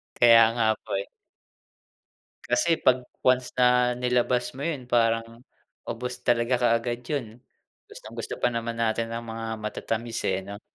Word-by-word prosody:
Kaya 115 -1 +7
nga 115 -2 +1 0.2
po, - - -17
eh. 100 - -6 1.4
Kasi 160 +7 +2
‘pag 125 -1 +3 0.2
once 130 0 +2
na 125 0 +4
nilabas 125 0 0
mo 140 - -5
yun, 140 -7 -4
parang 115 0 0 0.4
ubos 125 +2 -5
talaga 120 +1 +2
kaagad 120 0 +1
yun. 140 -4 -2 0.6
Gustong 110 +2 -11
gusto 115 - -4
pa - - +3
naman 115 -1 -4
natin 115 0 0
ang 115 0 -5
mga 115 0 -5
matatamis, 115 +2 -3
eh, 95 0 0
'no. 100 +1 -8
120 Hz, 145 wpm, -26 LUFS, 115-125 Hz, 1.4 s, Kaya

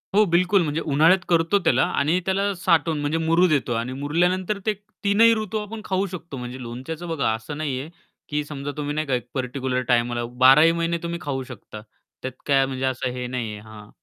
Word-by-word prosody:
हो, 215 - +6
बिलकुल. 185 +3 +4
म्हणजे 155 +1 -2
उन्हाळ्यात 160 +5 +4
करतो 170 +4 +3
त्याला 130 -3 +4 0.2
आणि 155 +6 +2
त्याला 195 +1 +1
साठवून, 165 -3 +1
म्हणजे 150 +3 0
मुरु 165 +3 +3
देतो. 140 -7 +1
आणि 120 +3 -2
मुरल्यानंतर 180 +8 0
ते 215 - +2 0.3
तीनही 220 +3 +5
ऋतू 215 -1 -3
आपण 215 +1 -7
खाऊ 190 +1 0
शकतो. 170 -6 -7
म्हणजे 125 +1 -7
लोणच्याच 130 +8 -6
बघा 160 -9 0
असं 110 +7 -6
नाहीये 145 -1 -3 0.4
की 150 0 -1
समजा 145 -1 -5
तुम्ही 145 0 -3
नाही 155 -1 -2
का 135 - -1
एक 125 - -4
पार्टिक्युलर 130 -1 -2
टाईमला, 120 -1 +1 0.2
बाराही 150 +5 +8
महिने 170 0 -1
तुम्ही 170 0 -3
खाऊ 135 -4 -3
शकता, 110 -4 -10 0.4
त्यात 130 - -4
काय 135 -2 +3
म्हणजे 130 0 -3
असं 130 -1 -1
हे 125 0 -4
नाहीये 115 -4 -4
हां. 105 -1 -13
150 Hz, 190 wpm, -23 LUFS, 130-170 Hz, 0.4 s, बाराही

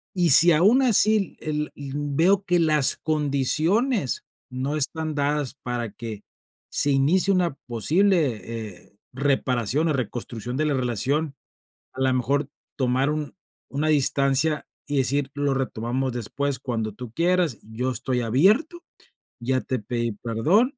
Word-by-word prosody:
Y 175 -2 +2
si 170 +6 +9
aun 205 - +4
así 215 -4 +3
el 150 -1 -3
el 140 -1 -8
veo 160 +7 +1
que 175 -2 +2
las 155 -4 +3
condiciones 155 - 0 0.3
no 130 +4 -3
están 155 +1 -2
dadas 145 -1 -1
para 120 -3 -3
que, 110 -3 -8 0.5
se 145 - +1
inicie 165 +9 +3
una 175 -6 0
posible, 150 - +1
eh, 110 -4 -8 0.2
reparación 135 +1 0
o 155 - +1
reconstrucción 120 -1 -4
de 155 - 0
la 150 - 0
relación, 135 +4 0 0.6
a 130 - -7
la 130 0 +2
mejor 135 +3 0 0.3
tomar 130 +1 +1
un 150 -1 -4 0.4
una 145 +3 -1
distancia 145 +1 +2 0.2
y 145 - -1
decir: 135 +1 0
"Lo 145 -1 0
retomamos 130 0 -2
después 130 +4 -2
cuando 115 -4 -3
tú 115 +2 -10
quieras, 170 -5 +1
yo 120 +4 -4
estoy 125 +1 -2
abierto, 210 - +2 0.6
ya 130 +2 0
te 130 - -3
pedí 120 +2 -3
perdón, 160 - +1
140 Hz, 140 wpm, -24 LUFS, 125-160 Hz, 0.6 s, si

